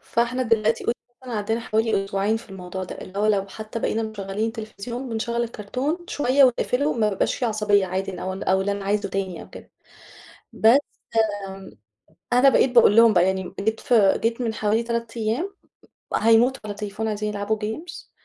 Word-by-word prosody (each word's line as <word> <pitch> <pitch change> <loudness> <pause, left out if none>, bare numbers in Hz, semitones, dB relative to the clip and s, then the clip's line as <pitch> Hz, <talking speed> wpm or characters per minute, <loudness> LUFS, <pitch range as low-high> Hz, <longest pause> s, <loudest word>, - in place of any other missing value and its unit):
فإحنا 240 +2 0
دلوقتي 225 -1 +1
يعتبر 235 - +1 0.4
عدّيتا 220 +3 -1
حوالي 220 -3 0
أسبوعين 195 +3 0
في 225 - -11
الموضوع 185 0 -6
ده - - -9
اللي 195 +2 -8
هو 210 - +2
لو 200 -2 +2
حتى 220 +3 -7
بقينا 225 0 -1
مشغّلين 210 0 -3
التلفزيون 230 +3 -6
بنشغّل 235 +1 -2
الكؤتون 250 - -3
شوية 275 0 +3
ونقفله 255 +3 +1
ما 215 -3 +1
بيبقاش 195 - 0
في - - -3
عصبية 210 -3 +2
عادي 190 +1 -3
ن 180 - -8
أو 190 - -3
ال 190 - -6
أو 190 0 +2
اللي 200 +1 0
أنا 200 -1 -5
عايزه 205 0 0
تاني 190 -2 -3
أو - - -15
كده - - -12 0.8
بس 230 +5 +6 0.7
م 190 0 -10 0.6
أنا 250 +3 +6
بقيت 265 -1 +4
باقول 235 -3 +6
لهم 230 -1 +7
بقى 175 -2 +4
يعني 190 0 0
م 180 - -10
جيت 220 +2 -1
ف - - -4
جيت 225 +3 +3
من 225 -2 -1
حوالي 215 +2 +1
3 235 0 -4
أيام 235 - -2 0.6
هيموتوا 230 +4 +4
على 205 - -4
التليفون 210 +1 -4
عايزين 210 0 -2
يلعبوا 205 +1 -1
games 230 +11 -6
220 Hz, 185 wpm, -23 LUFS, 200-235 Hz, 0.8 s, لهم